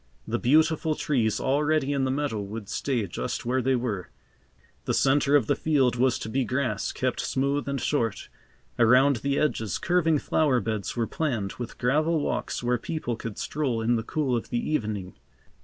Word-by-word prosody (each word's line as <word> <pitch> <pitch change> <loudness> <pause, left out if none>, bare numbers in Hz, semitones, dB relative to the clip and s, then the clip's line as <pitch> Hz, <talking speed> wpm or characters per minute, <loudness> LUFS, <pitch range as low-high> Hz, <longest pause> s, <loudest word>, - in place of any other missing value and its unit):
The - - -1
beautiful 155 +3 +3
trees 120 -9 0
already 145 +1 +1
in 135 -1 +1
the - - 0
meadow 135 -5 -1
would 105 +1 -7
stay 125 -6 -1
just 95 - -4
where 130 +2 +1
they 130 +1 +2
were. 110 -8 -3 0.8
The - - 0
centre 140 +1 +3
of 140 -6 +4
the - - +1
field 135 -6 +2
was 125 0 +2
to - - -6
be 130 +4 0
grass, 125 -3 -1
kept 130 -1 -2
smooth 140 +2 -1
and 140 -1 -1
short. 115 -8 -1 0.5
Around 125 +4 +5
the 140 +5 -1
edges, 110 -9 0
curving 175 -3 +2
flower 140 -3 +2
beds 110 -4 -3
were 115 - +1
planned, 115 -9 -2
with 120 -1 -6
gravel 155 +6 +2
walks 120 -4 -2
where 120 0 +1
people 125 -4 -3
could 110 -2 -7
stroll 135 -6 -1
in 115 +2 +2
the 115 - 0
cool 135 +2 -1
of 115 - -3
the 120 +4 -2
evening. 105 -9 -2
130 Hz, 180 wpm, -26 LUFS, 115-145 Hz, 0.8 s, Around